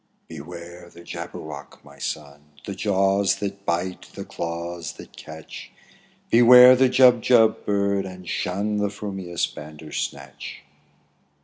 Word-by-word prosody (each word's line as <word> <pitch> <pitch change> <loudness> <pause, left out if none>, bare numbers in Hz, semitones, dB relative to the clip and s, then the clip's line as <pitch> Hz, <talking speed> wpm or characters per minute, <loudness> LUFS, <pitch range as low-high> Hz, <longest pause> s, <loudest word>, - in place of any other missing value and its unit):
''Beware 85 +2 -10
the 85 - -14
Jabberwock, 75 -3 -9
my 70 0 -16
son! 75 0 -7
The 100 - -5
jaws 100 0 +1
that 100 0 -6
bite, 90 +2 -2
the - - -7
claws 85 -1 -5
that - - -14
catch! 80 0 -11 0.6
Beware 125 +2 +9
the 130 0 +3
Jubjub 125 -3 +4
bird, 100 -1 0
and 90 -1 -11
shun 100 +5 -2
The 105 0 +1
f 100 0 -10
rumious 95 -4 -3
Bandersnatch 75 -2 -7
95 Hz, 120 wpm, -23 LUFS, 85-100 Hz, 0.6 s, Beware